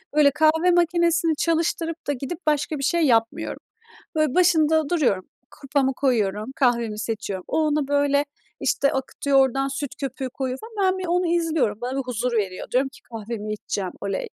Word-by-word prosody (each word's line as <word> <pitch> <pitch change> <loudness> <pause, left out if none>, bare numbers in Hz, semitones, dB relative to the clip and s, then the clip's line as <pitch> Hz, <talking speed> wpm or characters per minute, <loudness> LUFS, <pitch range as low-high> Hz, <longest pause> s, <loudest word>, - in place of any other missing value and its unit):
böyle 290 -2 +6
kahve 320 +4 +3
makinesini 340 -1 +2
çalıştırıp 330 +1 -1
da 290 - +1
gidip 280 +6 -5
başka 300 0 +1
bir 275 - -5
şey 340 +4 +2
yapmıyorum. 230 -3 +1 0.6
Böyle 310 -4 +1
başında 320 -4 +3
duruyorum. 260 - +1 0.3
Kupamı 275 -1 0
koyuyorum, 220 -3 0
kahvemi 235 -6 +1
seçiyorum, 215 -4 -4
o - - 0
ona 300 -2 +1
böyle 285 0 +2 0.4
işte 280 - +1
akıtıyor, 270 +1 0
oradan 270 +1 +2
süt 275 0 -4
köpüğü 270 -1 -3
koyuyor 260 -1 -3
falan 425 -4 -1
ben 375 - -5
bir 370 - -4
onu 355 +1 +1
izliyorum, 320 -11 0
bana 250 +2 -3
bir - - 0
huzur 250 -1 -2
veriyor, 195 -5 -2
diyorum 265 +2 +2
ki 270 - -17
"kahvemi 220 -2 -6
içeceğim, 200 -3 -4
oley." 200 -1 -3
275 Hz, 165 wpm, -23 LUFS, 240-320 Hz, 0.6 s, böyle